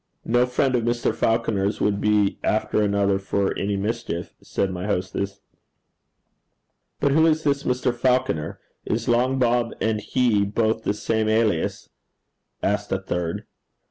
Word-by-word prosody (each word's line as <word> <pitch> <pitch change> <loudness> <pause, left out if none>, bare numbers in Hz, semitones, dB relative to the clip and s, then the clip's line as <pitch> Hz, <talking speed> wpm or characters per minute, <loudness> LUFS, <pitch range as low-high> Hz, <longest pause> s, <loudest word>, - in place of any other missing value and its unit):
No 120 +2 +3
friend 130 +1 +1
of 120 - +1
Mr. 120 0 0
Falconer's 105 -3 0
would 100 -1 +1
be 105 -2 +2
after - - +1
another 100 -1 +2
for 100 0 -1
any 100 0 -1
mischief,' 105 -4 -3
said 95 - -2
my 90 +2 -4
hostess. 95 0 -2 1.6
'But 140 - +2
who 160 +3 +5
is 160 0 +2
this 140 -1 +1
Mr. 125 -1 +1
Falconer? 125 - 0 0.2
Is 115 +2 -2
Long 125 +2 +2
Bob 120 -2 +1
and 110 -1 0
he 115 -4 +2
both 110 +2 0
the 100 - +1
same 110 +1 0
alias?' 110 -6 0 0.7
asked 105 0 0
a 95 - +2
third. 90 -3 -3
110 Hz, 140 wpm, -23 LUFS, 100-120 Hz, 1.6 s, who